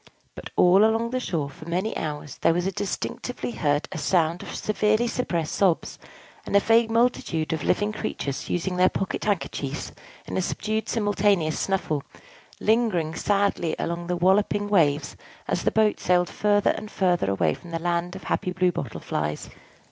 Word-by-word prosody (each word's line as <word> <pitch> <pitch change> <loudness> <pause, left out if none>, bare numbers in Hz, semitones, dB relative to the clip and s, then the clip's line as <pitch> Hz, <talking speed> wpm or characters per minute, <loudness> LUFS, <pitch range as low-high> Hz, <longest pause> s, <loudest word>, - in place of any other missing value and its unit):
But - - -9
all 185 +3 +6
along 225 +1 +2
the 255 - 0
shore, 165 - -2
for 155 +4 -11
many 185 +6 -1
hours, 150 -3 -5
there 165 - +4
was 175 0 0
distinctly 205 +5 -4
heard 145 -7 0
a - - -4
sound 170 -1 +1
of - - -7
severely 215 +2 +1
suppressed 170 -10 -2
sobs, 185 -5 +1 0.4
and - - -3
of 200 - +5
a - - -13
vague 225 0 +4
multitude 225 -9 +1
of 155 -3 -3
living 205 +1 +1
creatures 140 -9 -4
using 180 +1 -1
their 185 +1 +5
pocket 195 - -3
handkerchiefs 155 -8 -2 0.3
in - - -4
a - - +2
subdued 215 +4 -2
simultaneous 205 -7 +1
snuffle, 185 -7 -1 0.6
lingering 210 -8 +1
sadly 200 -3 0
along 170 0 -3
the 180 0 -1
walloping 205 +3 +2
waves 155 -7 +2 0.3
as - - -1
the - - +3
boat 215 -1 +2
sailed 180 0 +2
farther 205 -1 +2
and 215 - -6
farther 180 - +1
away 95 -5 +1
from 175 - -11
the 165 - -2
Land 175 +1 -1
of 190 - -8
the - - -10
Happy 180 - 0
Blue 180 0 +2
Bottle 135 -9 -5
Flies. 75 0 -3
180 Hz, 175 wpm, -25 LUFS, 165-210 Hz, 0.6 s, all